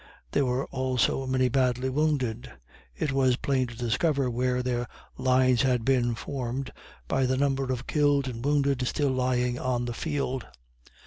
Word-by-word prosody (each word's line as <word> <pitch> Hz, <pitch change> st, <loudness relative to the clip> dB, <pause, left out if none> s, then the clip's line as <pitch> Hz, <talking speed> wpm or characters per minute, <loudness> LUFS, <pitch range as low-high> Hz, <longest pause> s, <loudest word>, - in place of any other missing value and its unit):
There 140 Hz, -, +2 dB
were 125 Hz, +2 st, 0 dB
also 130 Hz, 0 st, 0 dB
many 130 Hz, 0 st, +2 dB
badly 125 Hz, 0 st, +1 dB
wounded. 130 Hz, -5 st, -1 dB, 0.5 s
It 145 Hz, -, -1 dB
was 130 Hz, -2 st, +3 dB
plain 130 Hz, -1 st, 0 dB
to 120 Hz, -1 st, -10 dB
discover 130 Hz, +3 st, +1 dB
where 125 Hz, +1 st, 0 dB
their 120 Hz, -1 st, -1 dB, 0.3 s
lines 130 Hz, -1 st, +3 dB
had 125 Hz, -4 st, +1 dB
been 120 Hz, -3 st, +2 dB
formed, 130 Hz, +2 st, -4 dB, 0.3 s
by 130 Hz, -, +1 dB
the 130 Hz, +1 st, +1 dB
number 135 Hz, -1 st, 0 dB
of 125 Hz, 0 st, -3 dB
killed 145 Hz, -2 st, +2 dB
and 120 Hz, -2 st, -5 dB
wounded 140 Hz, -3 st, +1 dB
still 145 Hz, 0 st, 0 dB
lying 125 Hz, -1 st, 0 dB
on 125 Hz, -1 st, -1 dB
the 120 Hz, -, -3 dB
field. 140 Hz, -2 st, -3 dB
130 Hz, 155 wpm, -27 LUFS, 125-135 Hz, 0.5 s, was